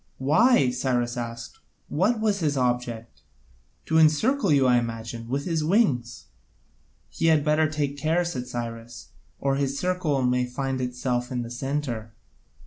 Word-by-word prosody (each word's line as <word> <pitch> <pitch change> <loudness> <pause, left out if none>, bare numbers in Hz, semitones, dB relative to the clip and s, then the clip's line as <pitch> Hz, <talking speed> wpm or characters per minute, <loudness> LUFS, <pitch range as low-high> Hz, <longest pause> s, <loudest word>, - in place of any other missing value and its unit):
"Why?" 150 - +4
Cyrus 125 -1 -1
asked, 115 0 -6 0.3
"what 210 +9 +1
was 210 -2 +1
his 150 -4 0
object?" 120 -2 -2 0.6
"To 160 0 +2
encircle 190 - +3
you, 140 -2 +4
I 125 -1 +5
imagine, 115 0 -6
with 140 +2 -2
his 165 -3 -1
wings." 150 - +1 0.8
"He - - -1
had 155 -2 +4
better 155 0 +3
take 145 -2 -2
care," 165 +4 +1
said 125 -7 -4
Cyrus, 115 -1 -7 0.3
"or 135 -1 0
his 140 0 -1
circle 180 -7 0
may 125 0 +1
find 130 +1 -3
itself 125 0 -2
in 125 -1 -2
the 115 - -8
centre. 120 -4 -4
135 Hz, 145 wpm, -25 LUFS, 120-155 Hz, 0.8 s, I